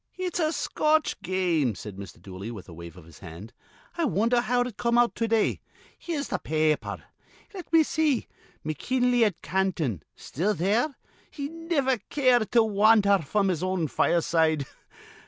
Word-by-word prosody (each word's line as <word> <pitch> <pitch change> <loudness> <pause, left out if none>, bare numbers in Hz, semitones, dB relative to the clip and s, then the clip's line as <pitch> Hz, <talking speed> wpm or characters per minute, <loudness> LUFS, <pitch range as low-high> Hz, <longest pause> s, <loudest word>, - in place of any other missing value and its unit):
"It's 365 -1 -3
a 310 -2 +1
Scotch 310 -1 0
game," 170 - 0
said 105 -1 -8
Mr. 100 -3 -10
Dooley, 95 +3 -8
with 110 -6 -9
a 85 - -11
wave 85 +2 -10
of 90 - -13
his 85 -2 -16
hand. 95 +6 -11 0.5
"I 335 - +2
wonder 235 0 +2
how 245 0 +1
it 245 -3 -3
come 235 +2 0
out 240 0 +3
to 230 - -1
day. 225 -1 +1 0.3
Here's 310 -5 -4
th' - - -2
pa 155 - -4 0.2
aper. - - -7 0.5
Let 370 -3 -9
me 325 -1 +6
see. 305 -5 0 0.4
McKinley 245 - +1
at 205 -6 -1
Canton. 165 - -1
Still 200 +9 -2
there. 225 - 0 0.3
He 280 -1 -6
niver 320 -6 -1
cared 250 -6 +2
to 235 -2 +6
wandher 205 -1 +4
fr'm 195 +5 0
his 175 -3 -1
own 185 -3 -1
fireside. 160 -2 +1
205 Hz, 165 wpm, -26 LUFS, 155-250 Hz, 0.5 s, me